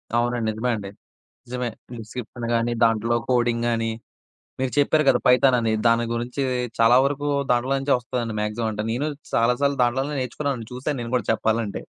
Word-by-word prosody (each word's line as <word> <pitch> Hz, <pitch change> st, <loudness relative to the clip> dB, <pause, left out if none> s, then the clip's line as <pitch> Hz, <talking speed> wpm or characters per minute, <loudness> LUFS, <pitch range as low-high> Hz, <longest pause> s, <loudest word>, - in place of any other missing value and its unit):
అవునండి. 120 Hz, -1 st, +1 dB
నిజమే 120 Hz, +3 st, -1 dB
అండి. 100 Hz, -2 st, -6 dB, 0.6 s
నిజమే. 125 Hz, 0 st, -3 dB, 0.3 s
డిస్క్రిప్షన్ 115 Hz, +2 st, -7 dB
గానీ, 115 Hz, +1 st, +1 dB
దాంట్లో 115 Hz, +1 st, +2 dB
కోడింగ్ 120 Hz, -1 st, +1 dB
గానీ 115 Hz, -1 st, 0 dB, 0.7 s
మీరు 130 Hz, -1 st, -1 dB
చెప్పారు 150 Hz, +2 st, +3 dB
కదా -, -, +5 dB
పైథాన్ 125 Hz, +1 st, +5 dB
అని. 115 Hz, -1 st, 0 dB, 0.2 s
దాని 115 Hz, 0 st, +3 dB
గురించి 120 Hz, +3 st, -3 dB, 0.4 s
చాలా 115 Hz, +1 st, +6 dB
వరకు 145 Hz, +1 st, -1 dB, 0.2 s
దాంట్లో 125 Hz, +2 st, +1 dB
నుంచే 135 Hz, +1 st, +1 dB
ఒస్తదండి. 120 Hz, -2 st, -4 dB
మాక్సిమమ్. 105 Hz, +2 st, -2 dB
అంటే 105 Hz, 0 st, -3 dB
నేను 130 Hz, +6 st, -1 dB, 0.3 s
చాలా 115 Hz, +2 st, +3 dB
సార్లు 140 Hz, 0 st, +2 dB
దాంట్లోనే 135 Hz, +4 st, 0 dB
నేర్చుకున్నానండి. 130 Hz, -2 st, -3 dB
చూసాను 135 Hz, +3 st, -3 dB
నేను 115 Hz, 0 st, -6 dB
కూడా 120 Hz, -5 st, 0 dB
చెప్పాలంటే. 110 Hz, -1 st, -1 dB
120 Hz, 160 wpm, -23 LUFS, 115-130 Hz, 0.7 s, చాలా